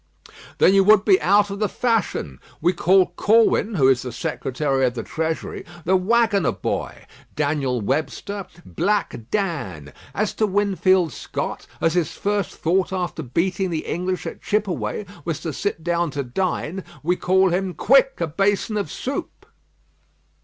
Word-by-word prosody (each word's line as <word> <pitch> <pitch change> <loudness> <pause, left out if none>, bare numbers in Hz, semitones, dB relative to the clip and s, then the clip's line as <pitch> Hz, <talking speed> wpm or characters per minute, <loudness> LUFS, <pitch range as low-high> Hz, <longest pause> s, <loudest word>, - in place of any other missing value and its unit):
"Then 190 - +5
you 195 0 +5
would 210 -1 +6
be 190 -3 +5
out 200 +5 +3
of 200 - -5
the 210 -2 +1
fashion. 225 - -1 0.2
We 175 +3 +2
call 185 +1 +3
Corwin, 220 0 +3
who 135 -6 +4
is 130 -2 +4
the 125 - -5
Secretary 135 +3 -2
of 125 -1 +1
the 115 - -4
Treasury, 160 0 -3 0.2
'The 185 +3 +3
Waggoner 205 -1 +2
boy;' - - -4 0.3
Daniel 140 -5 0
Webster, 155 - -3 0.2
'Black 175 - -1
Dan.' 100 - -3 0.2
As 210 0 0
to 215 - +1
Winfield 190 -4 +2
Scott, - - -5
as 165 - +2
his 175 -4 0
first 205 -2 -1
thought 180 +3 +1
after 180 -3 -3
beating 175 +8 -1
the 160 -2 -3
English 180 +2 -2
at - - -6
Chippeway, 190 - -1 0.2
was 165 -3 -3
to 160 -2 -4
sit 165 -2 -3
down 170 0 0
to 140 0 -3
dine, 180 +5 -2 0.2
we 175 +3 +2
call 190 +1 +3
him 185 0 -1
'Quick 270 +2 +4
a 170 - +1
basin 200 +6 0
of 205 - -3
soup.'" 275 +2 -5
180 Hz, 155 wpm, -22 LUFS, 155-200 Hz, 0.3 s, would